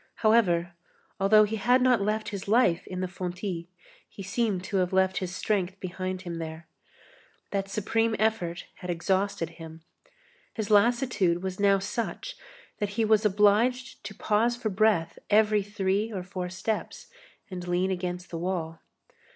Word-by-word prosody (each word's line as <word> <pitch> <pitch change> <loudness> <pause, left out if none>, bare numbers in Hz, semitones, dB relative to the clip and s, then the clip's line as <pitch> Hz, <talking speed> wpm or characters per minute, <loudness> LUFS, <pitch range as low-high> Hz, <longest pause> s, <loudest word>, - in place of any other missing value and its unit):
However, 175 -6 +3 0.5
although 215 +2 +6
he 215 +1 -1
had 245 +5 +4
not 250 -3 +3
left 215 +2 -1
his 200 -2 -6
life 210 -6 +3
in 185 0 -4
the 185 - -1
fontis, 180 -1 -4 0.4
he 195 - -9
seemed 200 -1 -1
to 195 - -2
have 180 0 +1
left 190 0 +2
his 185 0 -4
strength 190 -3 -1
behind 185 0 -4
him 170 -2 -5
there. 160 0 -6 0.9
That 195 -1 -2
supreme 220 +3 0
effort 210 -6 -1
had 180 - -8
exhausted 190 0 0
him. 160 0 -10 0.7
His 220 -2 -3
lassitude 205 -5 +3
was 190 0 -4
now 200 -1 +4
such 235 - -4 0.4
that 205 - -1
he 225 - +3
was 215 0 +3
obliged 210 +5 +2
to 210 - -7
pause 225 +4 +1
for 225 -3 -2
breath 195 -5 +1
every 210 0 +4
three 205 +1 -1
or 190 -4 -4
four 180 -1 -5
steps, 220 - -4 0.4
and 180 -1 -6
lean 180 +2 +1
against 180 -1 -4
the 165 - -4
wall. 165 -2 -3
195 Hz, 155 wpm, -27 LUFS, 180-215 Hz, 0.9 s, although